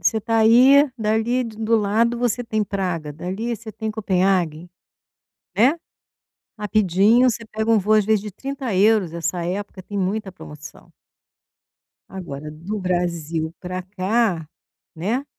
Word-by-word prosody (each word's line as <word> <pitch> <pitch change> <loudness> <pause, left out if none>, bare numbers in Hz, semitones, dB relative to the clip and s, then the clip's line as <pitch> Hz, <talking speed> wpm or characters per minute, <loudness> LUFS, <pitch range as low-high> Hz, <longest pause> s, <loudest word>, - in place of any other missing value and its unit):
você 220 - +1
tá 225 +2 0
aí, 260 +6 +6
dali 220 +4 +1
de 225 -2 -8
do 225 +1 +1
lado 225 +3 +1
você 245 0 0
tem 215 -2 -1
Praga, 180 -7 -3
dali 190 +9 -4
você 220 0 -9
tem 220 +1 -5
Copenhaguen, 185 -6 0 0.9
né. 250 +9 +4 0.8
Rapidinho 210 +4 +3
você 230 0 -5
pega 220 +1 -2
um 225 - +5
voo, 210 +3 +2
às 215 - +4
vezes 215 0 +2
de 210 0 -8
30€, 220 - +1
essa 170 +1 -3
época 190 +2 -4
tem 205 - -7
muita 195 +1 -2
promoção. 150 -3 -12 1.2
Agora 155 -6 -7
do 170 +8 -6
Brasil 170 -3 -2
pra 185 0 -5
cá, 185 -2 -1 0.5
né, 220 - -2
205 Hz, 135 wpm, -22 LUFS, 180-225 Hz, 1.2 s, aí